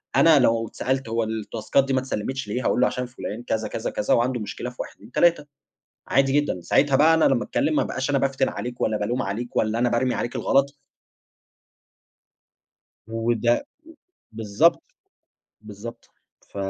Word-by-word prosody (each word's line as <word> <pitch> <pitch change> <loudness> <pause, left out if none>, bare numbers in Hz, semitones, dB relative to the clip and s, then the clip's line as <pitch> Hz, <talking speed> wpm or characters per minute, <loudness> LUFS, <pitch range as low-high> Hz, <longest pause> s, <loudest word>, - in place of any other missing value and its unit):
أنا 160 -3 +6
لو 115 -2 +2
اتسألت 130 0 -2
هو 115 0 0
الـتاسكات 110 +4 -1
دي 135 - -2
ما 130 - +3
اتسلمتش 130 0 -4
ليه 125 +5 -3
هاقول - - +2
له - - +5
عشان 125 - -3
فلان 120 -2 -7
كذا 110 -2 -2
كذا 110 - -4
كذا 105 - 0
وعنده 125 +1 +1
مشكلة 105 +4 -5
في 125 - -15
1 - - -6
2 110 +4 -17
3 170 -2 +3 0.6
عادي 135 0 +3
جدًا. 145 -11 +1
ساعتها 135 - +2
بقى 155 +3 +5
أنا 160 - +3
لمّا 130 -3 +2
أتكلّم 290 +2 0
ما - - +3
ابقاش 130 +2 -3
أنا 140 - +2
بافتن 135 0 0
عليك 125 0 -6
ولا 110 - +1
بالوم 120 +5 -1
عليك 110 +5 -5
ولا 110 +1 +1
أنا 120 0 +2
بارمي 120 +1 0
عليك 120 - -3
الغلط. 140 +1 +1 2.3
وده، 115 +1 +1
و - - -14 0.7
بالضبط، 110 +9 +2 0.8
بالضبط 110 +3 -10 0.4
ف - - -15
120 Hz, 170 wpm, -24 LUFS, 110-135 Hz, 2.3 s, أنا